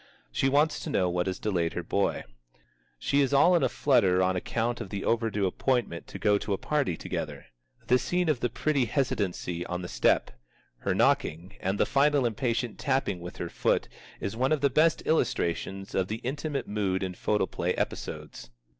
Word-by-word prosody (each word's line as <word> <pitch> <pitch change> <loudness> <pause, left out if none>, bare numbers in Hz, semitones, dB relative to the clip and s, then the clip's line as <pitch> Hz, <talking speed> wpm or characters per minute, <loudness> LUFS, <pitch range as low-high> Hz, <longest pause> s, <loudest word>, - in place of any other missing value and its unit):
She 135 - +1
wants 150 +3 +2
to - - -5
know 90 -10 +1
what 90 +1 0
has 95 - -2
delayed 90 -6 -1
her 85 - -3
boy. 100 +4 0 0.7
She 140 - +1
is 140 0 +1
all 175 +6 +6
in 170 - +3
a - - +2
flutter 100 -10 +3
on 95 0 +1
account 115 +6 -1
of - - -6
the 100 0 -4
overdue 110 -3 +1
appointment 110 -2 -1
to - - -8
go 105 -1 +3
to 100 - -2
a - - 0
party 140 - 0
together. - - -5 0.4
The 125 - +4
scene 180 +4 0
of 150 -6 +2
the 120 - 0
pretty 140 -2 +1
hesitancy 100 -7 -1
on 90 0 -3
the - - -4
step, - - +2 0.5
her - - -1
knocking, 85 +5 +1
and 95 +2 -1
the - - +4
final 140 -1 +3
impatient 120 0 -1
tapping 135 -9 0
with 90 0 -8
her - - -3
foot - - +1 0.3
is 100 - -4
one 130 +4 +1
of 155 -3 +2
the 140 -1 +3
best 160 +5 +3
illustrations 95 - -1
of 95 -1 +1
the 110 +3 -3
intimate 140 +2 -3
mood 100 -2 -1
in 95 -1 -3
photoplay 105 +3 0
episodes. - - -5
110 Hz, 190 wpm, -28 LUFS, 95-135 Hz, 0.7 s, all